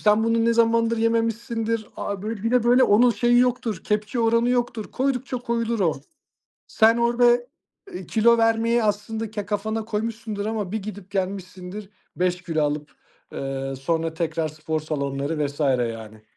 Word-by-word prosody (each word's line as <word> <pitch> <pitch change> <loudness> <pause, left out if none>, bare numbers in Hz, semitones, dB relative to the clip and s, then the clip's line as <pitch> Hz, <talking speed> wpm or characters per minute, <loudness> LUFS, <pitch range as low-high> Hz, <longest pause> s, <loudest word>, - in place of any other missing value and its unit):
sen 210 +1 +3
bunu 230 0 +2
ne 230 - +3
zamandır 230 0 +3
yememişsindir. 230 0 0
Abi, 200 -2 -4
böyle, 220 -2 -4
bir 230 - 0
de, 250 -2 +3
böyle, 245 +2 +5
onun 235 +4 +5
şeyi 240 +1 +3
yoktur, 245 -5 +1
kepçe 210 +3 -1
oranı 230 +1 +3
yoktur, 240 -3 -1
koydukça 260 -1 -1
koyulur 235 -2 -1
o. 160 -7 +1 0.7
Sen 225 +1 +4
orada, 235 +1 +2 0.7
ııı, - - -6
kilo 235 +1 +4
vermeyi 230 +1 +2
aslında 215 +1 -2
ke 205 -2 -5
kafana 220 +2 -2
koymuşsundur 215 -1 -3
ama 215 -4 -3
bir 220 - 0
gidip 200 -2 -8
gelmişsindir 190 0 -4 0.3
5 180 0 0
kilo 160 -3 -1
alıp, 150 0 -2 0.4
ııı, 135 0 -4
sonra 160 +4 -1
tekrar 160 -1 -1
spor 155 +1 -3
salonları 145 0 -2
vs. 145 +2 -9
yani. 115 -6 -1
215 Hz, 155 wpm, -24 LUFS, 170-230 Hz, 0.7 s, böyle